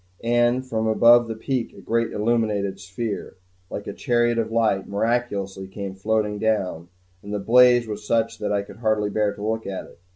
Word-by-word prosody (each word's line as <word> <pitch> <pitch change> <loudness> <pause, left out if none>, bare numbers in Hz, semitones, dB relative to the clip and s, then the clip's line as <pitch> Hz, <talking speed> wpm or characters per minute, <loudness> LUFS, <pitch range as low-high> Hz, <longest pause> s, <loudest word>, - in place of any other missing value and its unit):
And 120 +2 +2
from 110 -3 -1
above 120 +2 +6
the 115 - -4
peak 125 +2 -3
a - - -13
great 115 0 -1
illuminated 105 -3 0
sphere, 100 +3 -5 0.3
like 100 - -6
a - - -5
chariot 120 -2 +1
of 110 -1 -2
light, 110 -4 +1
miraculously 100 -3 -1
came 95 0 -6
floating 105 +1 -1
down; 95 -6 -1 0.3
and 100 - -9
the 105 - -1
blaze 120 +3 +5
was 105 -1 -6
such 115 +1 0
that 105 -1 -2
I 100 -1 +1
could 100 - -13
hardly 110 -2 0
bear 105 0 +1
to 105 - -6
look 110 0 -2
at 95 -1 -5
it. - - -18
110 Hz, 190 wpm, -23 LUFS, 100-115 Hz, 0.3 s, above